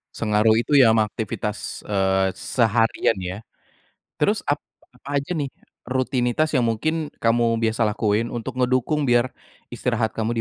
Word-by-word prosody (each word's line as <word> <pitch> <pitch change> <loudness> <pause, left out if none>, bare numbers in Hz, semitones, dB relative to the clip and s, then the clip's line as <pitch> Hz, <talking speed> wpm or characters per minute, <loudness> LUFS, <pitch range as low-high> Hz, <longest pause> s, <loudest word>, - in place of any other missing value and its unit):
Sengaruh 110 +1 +3
itu 145 +5 0
ya, 130 -5 +7
ama 110 -1 +3
aktivitas, 105 -1 -5
eee, 95 -2 +1
seharian 115 -2 +1
ya? 95 +1 -5 0.8
Terus - - +1
ap - - +2 0.3
apa 140 0 -3
aja 165 +4 -4
nih, 140 -3 -3 0.3
rutinitas 130 +3 0
yang 120 - +2
mungkin 155 +7 -1
kamu 115 0 +2
biasa 110 0 +1
lakuin, 105 +1 +1
untuk 120 +2 -5
ngedukung 130 +4 +1
biar 120 0 +3 0.4
istirahat 120 -3 -1
kamu 115 +1 0
115 Hz, 140 wpm, -23 LUFS, 110-130 Hz, 0.8 s, ya